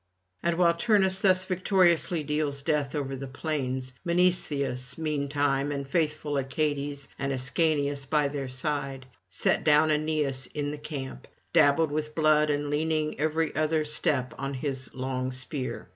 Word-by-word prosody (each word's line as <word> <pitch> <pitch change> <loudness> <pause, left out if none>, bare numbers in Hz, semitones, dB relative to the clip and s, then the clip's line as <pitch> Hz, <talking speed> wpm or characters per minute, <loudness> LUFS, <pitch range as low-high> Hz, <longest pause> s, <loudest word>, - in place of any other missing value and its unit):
And 170 -1 0
while 170 -1 +4
Turnus 190 0 +2
thus 185 -1 +4
victoriously 180 -3 +2
deals 145 -1 -1
death 150 -2 0
over 135 -2 -3
the 135 +1 -6
plains, 130 -2 -3
Mnestheus 150 -8 0
meantime 145 -2 0
and 140 -1 -4
faithful 150 -1 -1
Achates, 140 +1 -2
and 140 0 -1
Ascanius 140 +1 +1
by 150 0 +2
their 140 -1 -4
side, 135 0 -1 0.2
set - - +1
down 155 +1 +5
Aeneas 150 -4 0
in 145 -1 -2
the 150 - -7
camp, 140 - -6 0.3
dabbled 145 +2 +4
with 150 0 -3
blood 155 -1 +3
and 145 0 -1
leaning 155 -1 -1
every 155 +1 0
other 155 0 +1
step 145 -3 0
on 135 0 -3
his 130 0 -1
long 130 0 -3
spear. 130 +1 -3
145 Hz, 145 wpm, -27 LUFS, 135-155 Hz, 0.3 s, down